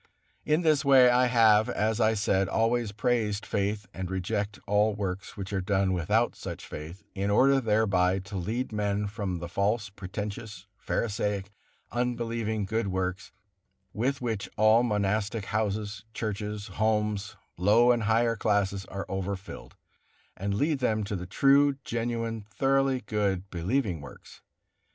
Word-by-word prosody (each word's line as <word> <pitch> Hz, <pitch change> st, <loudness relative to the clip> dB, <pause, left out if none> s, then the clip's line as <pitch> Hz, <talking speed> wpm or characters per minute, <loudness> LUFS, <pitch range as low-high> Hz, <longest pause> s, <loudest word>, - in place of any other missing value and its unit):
In 155 Hz, +3 st, +2 dB
this 155 Hz, -4 st, +3 dB
way 130 Hz, -3 st, +7 dB
I 125 Hz, +1 st, +4 dB
have, 110 Hz, -3 st, +5 dB
as 110 Hz, +2 st, 0 dB
I 110 Hz, 0 st, +3 dB
said, 95 Hz, -2 st, +1 dB
always 115 Hz, 0 st, +1 dB
praised 105 Hz, -1 st, 0 dB
faith, 100 Hz, +1 st, -1 dB
and 95 Hz, -1 st, -5 dB
rejected 100 Hz, +2 st, -3 dB
all 105 Hz, +1 st, +2 dB
works 95 Hz, -2 st, -4 dB
which 100 Hz, 0 st, -5 dB
are 95 Hz, -, 0 dB
done 95 Hz, 0 st, +1 dB
without 105 Hz, +7 st, +1 dB
such -, -, -7 dB
faith, 80 Hz, +7 st, -8 dB
in 100 Hz, 0 st, -2 dB
order 135 Hz, +6 st, +4 dB
thereby 100 Hz, -5 st, +2 dB
to 95 Hz, +1 st, -7 dB
lead 110 Hz, +8 st, -2 dB
men 105 Hz, -1 st, -1 dB
from 100 Hz, -3 st, -3 dB
the 85 Hz, 0 st, -6 dB
false, 105 Hz, +4 st, 0 dB
pretentious, 100 Hz, +1 st, -6 dB
pharisaic, 105 Hz, -2 st, -2 dB, 0.4 s
unbelieving 115 Hz, -3 st, -1 dB
good 110 Hz, +2 st, -1 dB
works, 95 Hz, 0 st, -3 dB, 0.6 s
with 130 Hz, +6 st, -1 dB
which 110 Hz, -5 st, -3 dB
all 110 Hz, +2 st, +5 dB
monastic 105 Hz, -1 st, 0 dB
houses, 105 Hz, -1 st, -2 dB
churches, 105 Hz, -1 st, -3 dB, 0.2 s
homes, 105 Hz, -2 st, 0 dB, 0.2 s
low 105 Hz, +7 st, +5 dB
and 120 Hz, -1 st, +2 dB
higher 115 Hz, +2 st, +2 dB
classes 100 Hz, -2 st, 0 dB
are 100 Hz, +1 st, -6 dB
overfilled, 95 Hz, 0 st, -5 dB, 0.6 s
and 100 Hz, +1 st, -2 dB
lead 145 Hz, +5 st, +1 dB
them 110 Hz, -4 st, +1 dB
to 100 Hz, 0 st, -3 dB
the 90 Hz, -1 st, -5 dB
true, 140 Hz, +7 st, +4 dB
genuine, 115 Hz, -1 st, -3 dB
thoroughly 135 Hz, 0 st, +1 dB
good, 100 Hz, -3 st, -1 dB
believing 90 Hz, -, -1 dB
works. -, -, -13 dB
105 Hz, 140 wpm, -28 LUFS, 100-115 Hz, 0.6 s, way